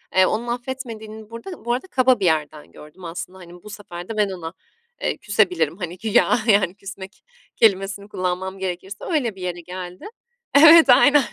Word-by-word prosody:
eee, 190 - +6
onun 225 +5 -2
affetmediğini 235 -4 -6
burada 230 +8 -9
bu 240 - +1
arada 260 +10 -4
kaba 255 -5 +2
bir 190 - 0
yerden 155 -2 -1
gördüm 150 +4 -14
aslında 180 +2 -7
hani 175 -1 -13
bu 210 - -11
sefer 180 -4 -9
de 220 - -5
ben 205 -2 +2
ona, 175 -2 -7 0.5
eee, - - -1
küsebilirim 180 -6 0
hani 180 -2 -6
güya 220 +3 +2
yani 200 -4 +3
küsmek 195 -1 -11 0.3
kelimesini 200 -2 +1
kullanmam 185 0 -3
gerekirse 190 +2 -5
öyle 255 - -1
bir 185 - -12
yere 175 -1 -4
geldi. 180 +1 -9 0.5
Evet 320 +1 +8
aynen, 280 +3 +6
195 Hz, 170 wpm, -22 LUFS, 180-230 Hz, 0.5 s, Evet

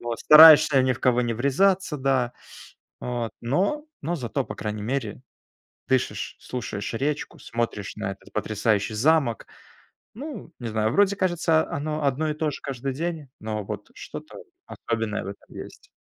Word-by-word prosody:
Вот 120 -1 -4
стараешься 155 -3 +9
ни 130 0 +2
в 120 - -7
кого 125 -1 +3
не 120 -1 -1
врезаться, 160 - +2
да. 130 -2 +1 0.7
Вот 120 -2 -3
но 195 - 0 0.2
но 170 +4 -1
зато 130 0 -2
по - - -7
крайней 105 -1 -4
мере 120 -3 -3 0.7
дышишь, 130 -1 -1
слушаешь 110 -4 -5
речку, 145 +5 -2
смотришь 115 -4 -3
на 105 -2 -3
этот 95 - -16
потрясающий 110 0 0
замок. 135 -1 +2 0.7
Ну, 265 - -8
не 120 - -4
знаю, 110 0 0
вроде 200 0 +4
кажется 170 -4 +2
оно 150 +1 -3
одно 140 +3 +1
и - - -2
то 155 0 -1
же 140 - -7
каждый 135 0 -4
день, 160 -2 -4
но 110 -1 -3
вот 105 0 -7
что-то - - -9 0.2
особенное 115 -2 -3
в - - -6
этом 100 - -11
есть. - - -16
130 Hz, 155 wpm, -25 LUFS, 115-155 Hz, 0.7 s, стараешься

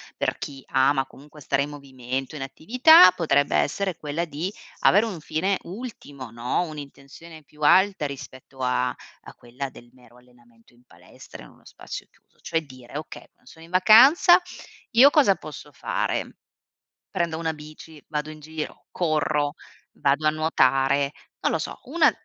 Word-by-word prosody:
per - - -2
chi 135 -2 -8
ama 135 +1 +2
comunque 150 +2 -16
stare 140 0 0
in 145 - -6
movimento, 135 -1 -6
in 135 - -5
attività, 200 - +6
potrebbe 145 -5 +1
essere 190 +3 0
quella 155 +3 -3
di 165 +4 -4 0.3
avere 205 +4 +5
un 200 -7 -6
fine 185 +6 -1
ultimo, 195 - -9
no, 120 +8 -2
un'intenzione 155 +1 -11
più 150 +2 -21
alta 190 +2 +4
rispetto 135 -1 -9
a 125 0 0 0.3
a - - -12
quella 125 +3 -7
del 120 -2 -16
mero 125 -1 -21
allenamento 120 -1 -24
in 120 +1 -26
palestra 90 -7 -15
in - - -14
uno - - -23
spazio - - -9
chiuso. - - -34
Cioè, 165 - -1
dire: 130 -1 -11
"Okay, 155 - -9
quando 125 - -22
sono 160 0 -14
in 170 - -19
vacanza, 255 - +7 0.5
io 255 +5 +7
cosa 275 -11 +4
posso 150 -1 -11
fare? - - -3 0.7
Prendo 170 -2 -2
una 165 -1 -2
bici, 155 0 -13
vado 150 -1 -4
in 155 0 -10
giro, 155 +1 -7
corro, 150 -3 0 0.4
vado 145 +2 +1
a - - +6
nuotare." 140 -3 +1 0.3
Non - - +1
lo - - 0
so, - - -6
una 330 +5 +3
150 Hz, 160 wpm, -24 LUFS, 135-170 Hz, 0.7 s, vacanza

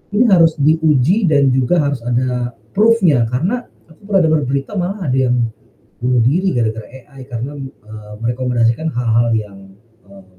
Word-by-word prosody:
ini 235 - +4
harus 165 -3 +5
diuji 160 - +2
dan 140 -3 +3
juga 130 +6 +1
harus 140 -3 -2
ada 125 0 -1 0.2
proof-nya, 190 - +3
karena 180 - -2 0.2
aku 160 - -21
pernah 195 -3 +2
dengar 160 -1 +2
berita 140 +6 -3
malah 185 +2 -3
ada 130 - 0
yang 125 - +2 0.7
bunuh 125 -1 +1
diri 180 +11 +1
gara-gara 110 -2 -2
AI 130 +1 -14
karena, 125 +4 -5
eee, 110 -6 -11
merekomendasikan 120 +3 0
hal-hal 120 -1 +1
yang, 105 -3 -3 0.5
mmm, 100 -1 -16
130 Hz, 150 wpm, -17 LUFS, 120-160 Hz, 0.7 s, harus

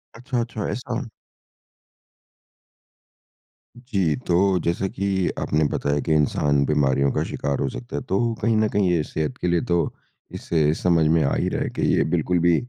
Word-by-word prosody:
अच्छा, 125 +2 -3
अच्छा 115 -3 -4
ऐसा। 125 +2 -4 2.7
जी। 100 - 0
तो 85 - +2 0.3
जैसा 85 +3 0
कि 100 +1 -3 0.3
आपने 75 +1 +1
बताया 70 0 0
कि 80 - 0
इंसान 70 -1 +2
बीमारियों 70 -1 +2
का - - 0
शिकार 70 -1 -3
हो - - 0
सकता - - -8
है - - -2
तो 95 - +1 0.2
कहीं 115 +1 +2
न 110 0 +3
कहीं 100 -3 +1
ये 85 -3 +2
सेहत 75 -2 -3
के 90 - -2
लिए 85 -1 +2
तो, 85 -1 0 0.4
इससे 80 -2 0
समझ 85 -2 +2
में 80 +1 +3
आ 70 - +1
ही - - 0
रहा - - -2
है - - -3
कि - - -5
ये - - +3
बिल्कुल 90 -1 +1
भी 85 -1 +5
85 Hz, 175 wpm, -23 LUFS, 75-100 Hz, 2.7 s, भी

